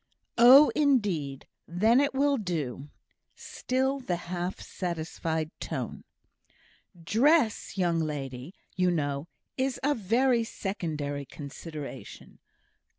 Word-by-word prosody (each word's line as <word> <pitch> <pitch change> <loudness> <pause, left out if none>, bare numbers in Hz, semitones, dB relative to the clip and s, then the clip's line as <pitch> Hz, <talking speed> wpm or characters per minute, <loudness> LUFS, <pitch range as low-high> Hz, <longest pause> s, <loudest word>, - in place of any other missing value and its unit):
"Oh! 265 +5 +9
indeed. 200 - +1 0.2
Then 220 +9 +3
it 285 -1 0
will 280 +1 +2
do" 150 - -4 0.5
(still 265 +2 -2
the 185 -9 -2
half 175 +1 -4
satisfied 160 -2 -3
tone). - - -5 1.0
"Dress, 235 - +2
young 175 -3 +1
ladies, 140 -1 -4 0.2
you 180 -1 +2
know, 145 -3 -1 0.3
is 260 0 0
a 290 +2 +3
very 235 +2 +2
secondary 155 -10 -4
consideration. 150 +1 -9
180 Hz, 95 wpm, -28 LUFS, 155-255 Hz, 1.0 s, Oh